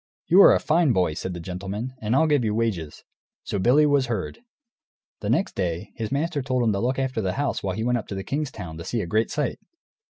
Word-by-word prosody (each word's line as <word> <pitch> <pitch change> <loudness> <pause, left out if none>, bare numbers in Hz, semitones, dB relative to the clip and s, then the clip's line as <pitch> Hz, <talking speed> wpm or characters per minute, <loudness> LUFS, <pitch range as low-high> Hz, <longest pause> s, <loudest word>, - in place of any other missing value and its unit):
"You 185 +4 +6
are - - +9
a - - +2
fine 160 -4 +2
boy," 90 -4 +1
said 90 +3 -5
the - - -5
gentleman, 95 +8 -5
"and 110 +1 0
I'll 160 - +4
give 145 -5 +2
you 105 -1 0
wages." 100 -10 -2 0.4
So 100 - -3
Billy 130 +9 +5
was 140 -3 +2
herd. 110 -5 -3 0.8
The - - -4
next 195 - +1
day, 90 +1 -3
his 110 -2 -5
master 150 +2 -1
told 130 -1 0
him 115 - +3
to 100 - -1
look 125 +4 0
after 130 -4 -1
the 95 -2 -1
house 145 0 -1
while 95 -2 -2
he 110 - -2
went 120 0 +1
up - - -9
to 100 - -5
the 95 - -4
king's 145 +4 -2
town, 90 -10 -8
to - - -6
see 115 +6 -2
a - - -3
great 110 +6 +1
sight. 150 -3 -2
115 Hz, 250 wpm, -24 LUFS, 95-135 Hz, 0.8 s, are